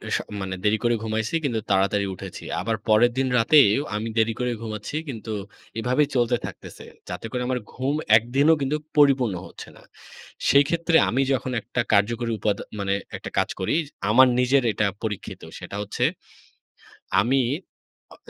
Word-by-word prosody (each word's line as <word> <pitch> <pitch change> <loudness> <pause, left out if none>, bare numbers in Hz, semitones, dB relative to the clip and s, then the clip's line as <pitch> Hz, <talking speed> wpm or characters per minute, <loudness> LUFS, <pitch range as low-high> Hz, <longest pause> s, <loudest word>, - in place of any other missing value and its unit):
স - - +3 0.2
মানে 95 0 -3
দেরি 105 +1 +3
করে 120 0 +3
ঘুমাইছি 110 +5 -2
কিন্তু 120 -6 0
তাড়াতাড়ি 100 +1 +2
উঠেছি। 95 0 -9 0.2
আবার 115 0 -1
পরের 110 +3 +5
দিন 135 0 +1
রাতেও 125 -1 +5
আমি 110 +2 -2
দেরি 115 0 +3
করে 125 0 0
ঘুমাচ্ছি 110 +3 -6
কিন্তু 115 -3 -6 0.5
এভাবেই 125 +5 +2
চলতে 120 -1 +2
থাকতেছে। - - -10 0.2
যাতে 90 +4 -6
করে 125 - -2
আমার 130 -1 0
ঘুম 135 +3 -1 0.2
একদিনও 135 +8 +3
কিন্তু 140 +2 0 0.2
পরিপূর্ণ 135 -7 +4
হচ্ছে - - -11
না। - - -17 0.7
সেই 140 0 +6
ক্ষেত্রে 170 +1 0
আমি 130 - +1
যখন 130 0 -2
একটা 120 +3 -2
কার্যকরী 115 +3 +2
উপাদ 105 0 +1 0.2
মানে 100 -1 0 0.2
একটা - - -8
কাজ - - +2
করি, 95 - 0 0.3
আমার 130 +4 +7
নিজের 130 +2 +3
এটা 105 - 0 0.2
পরীক্ষিত। 105 -3 -5 0.2
সেটা - - -8
হচ্ছে 105 - -3 1.2
আমি 130 +6 +2 0.7
অ - - -17
115 Hz, 155 wpm, -24 LUFS, 105-130 Hz, 1.2 s, আমার